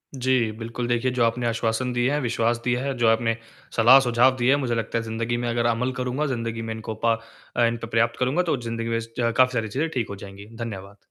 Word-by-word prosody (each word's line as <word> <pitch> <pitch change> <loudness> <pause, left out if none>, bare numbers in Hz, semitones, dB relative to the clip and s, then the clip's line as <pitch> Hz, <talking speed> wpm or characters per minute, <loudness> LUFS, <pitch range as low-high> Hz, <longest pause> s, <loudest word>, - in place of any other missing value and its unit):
जी, 130 -3 +1
बिल्कुल, 115 +2 -5
देखिए, 120 +1 +1
जो 125 -2 +1
आपने 115 +1 0
आश्वासन 115 +2 -1
दिए 120 +2 +1
हैं, 145 - +1
विश्वास 120 -1 +1
दिया 125 0 0
है, 140 0 -1
जो 120 - +2
आपने 115 0 +2 0.4
सलाह-सुझाव 125 +1 +6
दिए 120 +1 +2
हैं, 140 - +6
मुझे 120 -2 -1
लगता 115 0 -2
है, 115 - -1
ज़िंदगी 115 +1 -2
में 120 - -1
अगर 120 0 0
अमल 120 +2 +1
करूँगा, 125 +4 -1
ज़िंदगी 115 -3 -3
में 115 0 -4
इनको 110 0 -6
प 115 -1 +3 0.4
अ, 120 - +4
इन 115 0 0
त 115 - -6
पर्याप्त 115 +1 +2
करूँगा, 130 +7 +2
तो 160 -5 0
ज़िंदगी 115 0 -3
में 115 0 0
ज़ 115 - -7
ज 115 -1 +1
काफ़ी 130 0 +5
सारी 115 -3 -1
चीज़ें 145 +10 -1
ठीक 120 -5 -2
हो 100 - -5
जाएँगी। 100 0 -10
धन्यवाद। 100 -3 -7
115 Hz, 245 wpm, -24 LUFS, 115-125 Hz, 0.4 s, सलाह-सुझाव